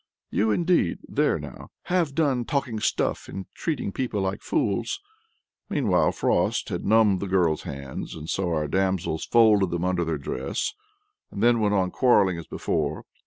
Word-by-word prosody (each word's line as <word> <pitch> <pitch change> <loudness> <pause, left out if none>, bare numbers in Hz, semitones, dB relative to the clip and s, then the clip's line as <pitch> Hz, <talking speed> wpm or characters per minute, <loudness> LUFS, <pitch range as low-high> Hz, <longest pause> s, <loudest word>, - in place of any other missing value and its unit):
"You, 110 +2 +1
indeed! 165 - +2
there - - +1
now, - - -9
have 170 -6 0
done 140 -7 +2
talking 125 -4 -2
stuff - - -1
and 95 -1 -6
treating 150 - -2
people 120 -2 -2
like 95 +1 -2
fools!" 325 +5 -1 0.7
Meanwhile, 110 -12 +2
Frost - - 0
had - - -3
numbed 105 -3 +4
the 100 - -3
girl's 90 -5 +2
hands, 70 +1 -7
so 95 +3 -1
our 75 -2 0
damsels 95 -1 0
folded 110 -5 +4
them 85 +1 -2
under 90 -1 +1
their 80 -2 -1
dress, 70 - -3 0.6
and 100 - -4
then 120 0 +5
went 105 -1 +2
on 95 -2 +1
quarrelling 100 -9 +3
as 85 - -9
before. - - -2
100 Hz, 160 wpm, -25 LUFS, 90-120 Hz, 0.7 s, then